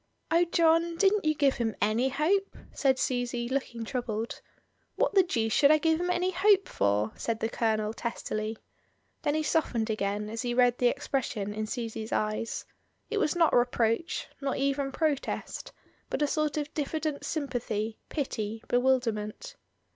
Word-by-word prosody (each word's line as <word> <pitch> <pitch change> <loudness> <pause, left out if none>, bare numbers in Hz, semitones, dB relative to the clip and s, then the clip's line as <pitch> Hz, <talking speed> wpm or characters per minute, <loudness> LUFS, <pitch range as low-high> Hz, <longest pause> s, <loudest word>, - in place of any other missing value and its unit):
"Oh! 335 +1 +5
John, 335 0 +3
didn't 400 0 +3
you 310 0 +3
give 285 -2 +2
him 225 -2 -1
any 225 +5 +2
hope?" 360 +9 0 0.2
said 265 -2 +2
Susy, 245 -2 -1
looking 240 -3 -3
troubled. 230 -2 -3 0.5
"What - - +1
the 390 - +7
deuce 225 -11 0
should 285 - +6
I 310 - +7
give 320 +1 +1
him 355 - -1
any 360 +1 +1
hope 390 +1 +4
for?" 105 +2 +1
said 230 -1 -2
the 225 - -1
Colonel, 220 -2 0
testily. 220 -1 -3 0.6
Then 290 - 0
he 310 - +1
softened 240 -9 0
again 210 0 -1
as 225 +1 -4
he 240 -1 -2
read 245 -1 +4
the 245 - +4
expression 245 -6 -2
in 215 +1 -3
Susy's 225 -1 -4
eyes; 215 +2 -1 0.5
it 430 - +1
was 330 -6 +1
not 335 -2 +4
reproach, 240 +4 +1
not 275 -1 -1
even 275 0 0
protest, 295 -1 -2 0.4
but - - 0
a - - +5
sort 305 0 0
of 295 0 -3
diffident 305 0 -2
sympathy, 230 -7 -2
pity, 225 -7 -3
bewilderment. 245 - 0
255 Hz, 160 wpm, -29 LUFS, 225-310 Hz, 0.6 s, the